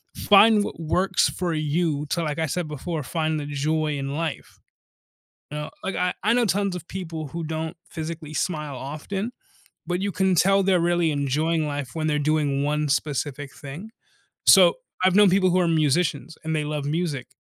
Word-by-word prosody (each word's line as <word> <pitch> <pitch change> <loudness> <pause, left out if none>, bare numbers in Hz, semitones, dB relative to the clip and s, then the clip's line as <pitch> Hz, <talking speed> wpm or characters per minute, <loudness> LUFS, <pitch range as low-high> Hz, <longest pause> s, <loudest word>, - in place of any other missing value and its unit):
find 210 +1 +6
what - - -6
works 180 +4 +2
for 175 -2 -2
you 155 -1 0
to, 170 - 0
like 150 -2 -2
I 160 - +1
said 165 +3 -2
before, 155 +2 -4
"Find 155 +2 -1
the 145 - -5
joy 150 +1 -1
in 140 0 -4
life." 160 -2 -4 0.9
You 150 - -4
know? 150 - -5
Like, 195 - -2
I 180 0 0
I 215 +4 +3
know 240 -1 +3
tons 200 0 0
of 175 -1 -8
people 165 -4 -5
who 165 +4 -5
don't 160 +2 -4
physically 160 -1 -6
smile 150 -5 -2
often, 175 - -5 0.6
but 180 +1 -1
you 200 0 -1
can 190 -1 +1
tell 195 +3 +4
they're 185 -1 +3
really 175 -1 +2
enjoying 155 +3 0
life 145 -3 -4
when 155 -1 -2
they're 150 -1 +1
doing 145 -2 +1
one 150 +1 0
specific 145 0 -2
thing. 155 +11 -9 0.6
So, - - +8 0.3
I've 185 -1 +4
known 205 -1 +6
people 185 0 +3
who 185 +1 +3
are 175 - +2
musicians, 160 0 +1
and 160 0 -1
they 150 - -1
love 150 -1 -3
music, 145 -5 -2
160 Hz, 185 wpm, -24 LUFS, 150-180 Hz, 0.9 s, So